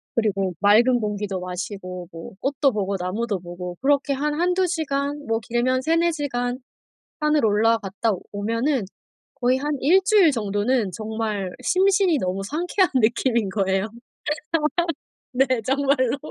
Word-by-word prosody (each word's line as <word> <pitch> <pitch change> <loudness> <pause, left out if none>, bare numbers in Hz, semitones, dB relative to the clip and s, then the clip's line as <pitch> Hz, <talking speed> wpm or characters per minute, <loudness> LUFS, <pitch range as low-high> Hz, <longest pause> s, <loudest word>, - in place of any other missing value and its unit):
그리고 195 -5 0
맑은 235 +5 +5
공기도 210 -3 -3
마시고 180 0 -6
뭐 165 0 -9
꽃도 275 0 +2
보고 200 -3 -2
나무도 200 +3 -2
보고 175 0 -7
그렇게 280 +1 +2
한 295 +2 -1
1-2 360 +2 +2
시간 290 -3 -2
뭐 225 0 +1
길면 240 +3 0
3-4 330 +4 +2
시간 250 -5 -2 0.6
산을 300 -3 +2
올라갔다 220 0 +1 0.2
오면은 230 +6 0 0.5
거의 250 +1 +2
한 295 +2 -2
1 345 +8 +5
주일 395 -6 +5
정도는 210 -1 0
정말 215 -1 -3
심신이 380 -3 +3
너무 185 -1 -2
상쾌한 350 - +1
느낌인 235 -2 +2
거예요. 195 0 0 1.5
네 260 +2 +3 0.2
정말로. 270 +1 +1
235 Hz, 255 characters per minute, -23 LUFS, 205-285 Hz, 1.5 s, 맑은